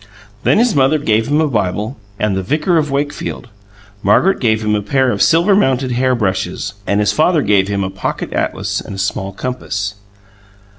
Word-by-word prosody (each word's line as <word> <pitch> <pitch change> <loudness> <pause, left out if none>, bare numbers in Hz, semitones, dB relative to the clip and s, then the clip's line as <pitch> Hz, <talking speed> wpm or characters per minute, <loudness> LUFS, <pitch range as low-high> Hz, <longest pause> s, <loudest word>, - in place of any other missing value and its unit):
Then - - +3
his 235 0 +3
mother 140 +1 +3
gave 115 -6 +1
him 150 +1 +2
a 160 - +2
Bible 105 0 -2 0.2
and 105 -1 0
"The 95 - -1
Vicar 150 - 0
of 150 -1 -1
Wakefield"; 140 -2 -3 0.5
Margaret 180 - +3
gave 110 -3 +1
him 105 - +1
a 105 - +1
pair 130 +5 +1
of 100 - -2
silver 170 +5 +4
mounted 130 -8 +1
hair 130 +1 +1
brushes; 100 -3 -2
and 100 - +1
his 105 - +2
father 155 -1 +2
gave 100 -2 +2
him 100 -1 -1
a 95 - -3
"Pocket 95 - -4
Atlas" - - -2
and 100 - -8
a - - -8
small 95 0 -2
compass. 105 -2 -4
120 Hz, 190 wpm, -16 LUFS, 100-145 Hz, 0.5 s, silver